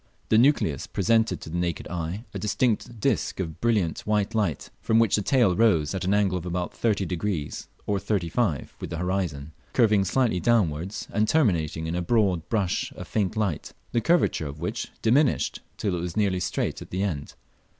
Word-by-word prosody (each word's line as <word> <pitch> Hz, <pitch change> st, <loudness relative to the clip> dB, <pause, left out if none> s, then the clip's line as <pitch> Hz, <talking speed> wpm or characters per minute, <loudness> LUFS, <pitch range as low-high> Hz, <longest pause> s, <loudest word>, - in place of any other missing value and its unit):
The 110 Hz, -, +5 dB
nucleus 120 Hz, -, +2 dB
presented 110 Hz, +3 st, +1 dB
to 80 Hz, -, -8 dB
the 85 Hz, -, -1 dB
naked 85 Hz, -2 st, -2 dB
eye 90 Hz, +6 st, -4 dB
a -, -, -4 dB
distinct 110 Hz, +2 st, 0 dB
disc 115 Hz, -3 st, 0 dB
of 85 Hz, -3 st, -4 dB
brilliant 105 Hz, -9 st, +1 dB
white 105 Hz, -1 st, 0 dB
light, 100 Hz, -, -1 dB
from 110 Hz, -, +2 dB
which 115 Hz, -3 st, +4 dB
the 105 Hz, -, +1 dB
tail 115 Hz, -4 st, +3 dB
rose 85 Hz, -9 st, +3 dB
at 95 Hz, -, -3 dB
an 95 Hz, -, 0 dB
angle 100 Hz, -3 st, +2 dB
of 85 Hz, -, -9 dB
about 90 Hz, 0 st, -2 dB
30° 95 Hz, -6 st, -2 dB, 0.2 s
or 100 Hz, -1 st, 0 dB
35° 95 Hz, -, -1 dB
with -, -, -6 dB
the 85 Hz, -, -4 dB
horizon, 85 Hz, -5 st, -2 dB, 0.2 s
curving 105 Hz, -5 st, +4 dB
slightly 110 Hz, 0 st, +1 dB
downwards, 95 Hz, -3 st, 0 dB
and 105 Hz, +1 st, +2 dB
terminating 85 Hz, -, +1 dB
in 80 Hz, -, -2 dB
a 90 Hz, -, -1 dB
broad 95 Hz, -4 st, +1 dB
brush 100 Hz, -6 st, 0 dB
of -, -, -9 dB
faint 105 Hz, -1 st, -1 dB
light, 100 Hz, -8 st, -2 dB, 0.2 s
the 115 Hz, -, +1 dB
curvature 165 Hz, -, +2 dB
of 70 Hz, +1 st, -7 dB
which -, -, -3 dB, 0.2 s
diminished 130 Hz, +5 st, +2 dB, 0.2 s
till 100 Hz, -, -1 dB
it 85 Hz, -, -3 dB
was 90 Hz, +1 st, -5 dB
nearly 100 Hz, -3 st, +2 dB
straight 90 Hz, -, -2 dB
at -, -, -9 dB
the 95 Hz, +2 st, -1 dB
end. 80 Hz, -8 st, -3 dB
95 Hz, 185 wpm, -26 LUFS, 85-110 Hz, 0.2 s, The